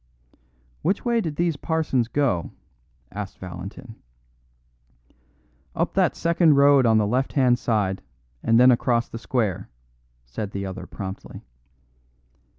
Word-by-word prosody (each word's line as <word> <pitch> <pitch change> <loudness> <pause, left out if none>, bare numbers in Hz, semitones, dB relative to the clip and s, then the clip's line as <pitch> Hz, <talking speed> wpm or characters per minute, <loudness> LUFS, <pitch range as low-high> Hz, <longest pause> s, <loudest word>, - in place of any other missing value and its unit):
"Which 190 +9 -1
way 235 -1 +2
did 160 -7 -4
these 170 -1 0
parsons 150 -7 0
go?" 120 -11 0 0.6
asked 100 -1 -6
Valentin. 95 +7 -9 1.8
"Up - - -1
that - - +2
second 170 -2 +3
road 140 -2 +5
on 110 -1 +4
the 105 - +2
left 125 +6 -1
hand 125 -3 +3
side, 105 -6 0 0.4
and 115 +1 +3
then 125 +1 +7
across 120 -1 +1
the 115 - -7
square," 115 - -2 0.6
said 80 - -5
the 100 0 -3
other 95 -1 -7
promptly. 95 -1 -8
120 Hz, 125 wpm, -24 LUFS, 100-145 Hz, 1.8 s, then